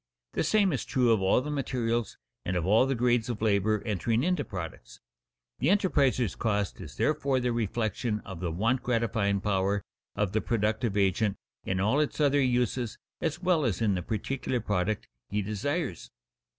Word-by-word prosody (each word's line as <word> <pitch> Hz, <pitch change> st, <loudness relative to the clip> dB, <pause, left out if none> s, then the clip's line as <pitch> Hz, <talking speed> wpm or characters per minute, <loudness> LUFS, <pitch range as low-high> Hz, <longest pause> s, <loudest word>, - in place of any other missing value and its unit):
The -, -, 0 dB
same 195 Hz, +1 st, +3 dB
is 135 Hz, -, -1 dB
true 125 Hz, -3 st, +2 dB
of 110 Hz, -3 st, +3 dB
all 95 Hz, +6 st, +3 dB
the 150 Hz, +3 st, -4 dB
materials 120 Hz, -5 st, -1 dB, 0.3 s
and 90 Hz, -, -2 dB
of 85 Hz, -, -1 dB
all 110 Hz, +7 st, +4 dB
the 135 Hz, -, 0 dB
grades 120 Hz, -1 st, +2 dB
of 115 Hz, -4 st, -3 dB
labor 105 Hz, -1 st, +2 dB
entering 110 Hz, +3 st, 0 dB
into 180 Hz, -3 st, +1 dB
products. 85 Hz, -, -7 dB, 0.6 s
The 135 Hz, -, +1 dB
enterpriser's 145 Hz, -, +2 dB
cost 105 Hz, -3 st, -1 dB
is 70 Hz, -5 st, -9 dB
therefore 140 Hz, -, +1 dB
the 125 Hz, -1 st, 0 dB
reflection 115 Hz, 0 st, -1 dB
of 95 Hz, -4 st, -8 dB
the 90 Hz, -1 st, -2 dB
want 115 Hz, +10 st, +1 dB
gratifying 115 Hz, -5 st, 0 dB
power 100 Hz, 0 st, 0 dB, 0.3 s
of 100 Hz, -2 st, 0 dB
the 110 Hz, +1 st, +1 dB
productive 110 Hz, -1 st, 0 dB
agent 100 Hz, +1 st, +2 dB, 0.3 s
in 95 Hz, 0 st, -1 dB
all 110 Hz, +9 st, +2 dB
its 150 Hz, 0 st, -1 dB
other 145 Hz, -1 st, +4 dB
uses 125 Hz, -2 st, 0 dB, 0.2 s
as 165 Hz, +1 st, -2 dB
well 175 Hz, -4 st, +3 dB
as 110 Hz, -9 st, 0 dB
in 110 Hz, -3 st, +2 dB
the 90 Hz, -, -1 dB
particular 125 Hz, +5 st, -2 dB
product 105 Hz, -1 st, -1 dB, 0.2 s
he 105 Hz, 0 st, -1 dB
desires. 110 Hz, -, -3 dB
115 Hz, 175 wpm, -28 LUFS, 100-130 Hz, 0.6 s, all